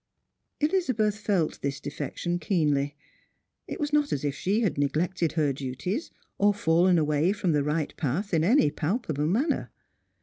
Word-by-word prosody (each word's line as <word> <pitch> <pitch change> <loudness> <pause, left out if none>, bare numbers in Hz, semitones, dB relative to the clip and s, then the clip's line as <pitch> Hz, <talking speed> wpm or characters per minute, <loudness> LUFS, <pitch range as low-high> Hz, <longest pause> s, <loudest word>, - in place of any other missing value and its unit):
Elizabeth 255 - +1
felt 195 -7 0
this 140 0 -2
defection 150 +5 -3
keenly. 150 -5 +1 0.7
It - - -6
was 295 0 -2
not 295 -1 +2
as 145 - -1
if 145 - 0
she 195 +10 0
had 210 -7 +1
neglected 160 +4 0
her 150 -3 +1
duties, 140 - -4 0.3
or 205 0 +4
fallen 175 -1 +3
away 155 +3 +2
from 200 -4 0
the 145 -2 +2
right 150 +1 -1
path 170 - -2
in 160 -1 +3
any 200 - +4
palpable 155 - -1
manner. 265 - 0
170 Hz, 155 wpm, -27 LUFS, 150-205 Hz, 0.7 s, or